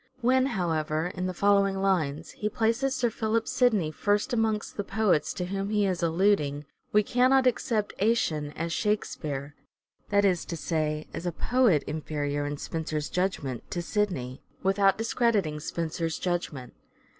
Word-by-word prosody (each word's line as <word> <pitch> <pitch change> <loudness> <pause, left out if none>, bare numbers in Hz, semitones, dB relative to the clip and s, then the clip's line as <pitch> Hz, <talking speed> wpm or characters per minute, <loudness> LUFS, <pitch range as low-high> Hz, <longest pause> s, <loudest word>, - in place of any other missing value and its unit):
When, 260 +2 +3
however, 165 - -1
in 180 +1 -2
the 185 - -3
following 200 0 +3
lines 170 -7 0
he 210 - -3
places 230 +4 +1
Sir 240 -2 +1
Philip 220 +1 0
Sidney 215 -11 +2
first 205 - 0
amongst 220 -2 0
the 205 - -2
poets 195 -5 +1
to 180 - -2
whom 195 +2 -3
he 210 -1 +2
is 185 -3 -1
alluding, 165 -4 +1 0.3
we 210 0 +4
cannot 255 +3 +3
accept 225 -4 0
" - - -28
Action 160 -9 +1
" - - -19
as 165 +1 -3
Shakespeare 150 -10 -2 0.3
— - - -42
that 200 0 +3
is 180 -3 +2
to 170 - -5
say, 155 -1 -1
as 175 - -4
a - - 0
poet 225 - +2
inferior, 145 -1 -2
in 145 0 -3
Spenser's 155 -1 -3
judgment, 165 -9 -2
to 175 - -3
Sidney 170 - -2
— - - -31
without 195 0 +3
discrediting 220 -8 +1
Spenser's 165 +1 -3
judgment. 170 -8 -3
185 Hz, 165 wpm, -28 LUFS, 155-215 Hz, 0.3 s, we